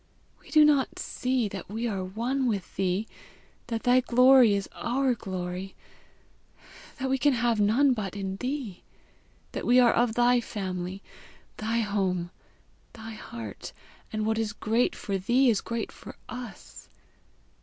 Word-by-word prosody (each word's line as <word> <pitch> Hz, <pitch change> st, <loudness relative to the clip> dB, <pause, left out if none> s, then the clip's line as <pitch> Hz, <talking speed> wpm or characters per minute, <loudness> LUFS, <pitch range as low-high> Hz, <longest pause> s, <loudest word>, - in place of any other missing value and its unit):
We -, -, -18 dB
do 305 Hz, -1 st, +6 dB
not 285 Hz, -3 st, +2 dB
see 255 Hz, -3 st, -1 dB
that 195 Hz, -2 st, -8 dB
we 225 Hz, +3 st, -2 dB
are 195 Hz, -4 st, -2 dB
one 240 Hz, +8 st, -1 dB
with 200 Hz, -6 st, -3 dB
thee, 190 Hz, +3 st, 0 dB, 0.6 s
that 230 Hz, -1 st, -3 dB
thy 250 Hz, +1 st, +5 dB
glory 250 Hz, -2 st, +6 dB
is 200 Hz, -1 st, -2 dB
our 260 Hz, +1 st, 0 dB
glory, 185 Hz, -2 st, -5 dB, 1.2 s
that 265 Hz, -, -2 dB
we 265 Hz, 0 st, 0 dB
can 290 Hz, 0 st, +4 dB
have 235 Hz, -2 st, +1 dB
none 255 Hz, +7 st, +4 dB
but 205 Hz, -5 st, -4 dB
in 195 Hz, -1 st, -4 dB
thee! 250 Hz, -6 st, -4 dB, 0.7 s
that -, -, -5 dB
we 250 Hz, +1 st, +5 dB
are 240 Hz, -2 st, +5 dB
of 235 Hz, -2 st, +1 dB
thy 245 Hz, 0 st, +4 dB
family, 190 Hz, -4 st, -5 dB, 0.5 s
thy 225 Hz, +2 st, 0 dB
home, 190 Hz, -4 st, -1 dB, 0.6 s
thy 225 Hz, 0 st, -9 dB
heart, 115 Hz, -, -8 dB, 0.4 s
and 215 Hz, 0 st, -2 dB
what 220 Hz, 0 st, 0 dB
is 215 Hz, -2 st, -1 dB
great 225 Hz, +4 st, 0 dB
for 195 Hz, -1 st, -3 dB
thee 245 Hz, +6 st, +3 dB
is 210 Hz, -, 0 dB
great 230 Hz, 0 st, -4 dB
for -, -, -11 dB
us! 245 Hz, -4 st, -9 dB
225 Hz, 150 wpm, -27 LUFS, 195-250 Hz, 1.2 s, do